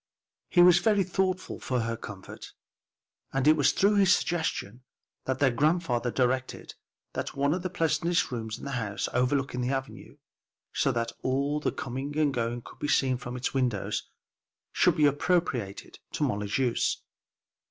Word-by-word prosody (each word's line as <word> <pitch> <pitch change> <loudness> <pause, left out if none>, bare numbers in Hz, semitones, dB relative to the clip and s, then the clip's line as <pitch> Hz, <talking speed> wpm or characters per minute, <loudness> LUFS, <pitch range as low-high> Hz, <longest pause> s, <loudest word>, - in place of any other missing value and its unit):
He 175 - +6
was 180 0 +7
very 205 +1 +3
thoughtful 185 0 -1
for 125 -2 -1
her 115 0 -2
comfort, 105 -4 -10 0.8
and 135 +1 0
it 155 - +7
was 145 -3 +4
through 205 +1 +3
his 195 -2 +5
suggestion, 155 - -2 0.4
that 130 - -1
their 135 -2 +3
grandfather 140 -2 +1
directed 130 +1 -1 0.4
that - - -4
one 140 +2 +2
of 180 - -2
the 185 - -3
pleasantest 170 +1 +1
rooms 110 -2 -4
in - - -10
the 140 - -4
house, 105 -6 -2
overlooking 125 0 0
the 125 - -1
avenue, 135 0 -5 0.6
so 140 - +2
that 115 -2 -1
all 140 +3 0
the - - -1
coming 135 +4 -5
and 150 -3 +2
going 120 -1 -2
could - - -14
be 145 - -2
seen 130 -3 +2
from 125 0 -6
its 125 - -2
windows, 125 -7 -1 0.6
should - - +3
be 150 - +5
appropriated 145 - 0
to - - -1
Molly's 105 0 -1
use. 125 -3 0
135 Hz, 165 wpm, -28 LUFS, 120-160 Hz, 0.8 s, was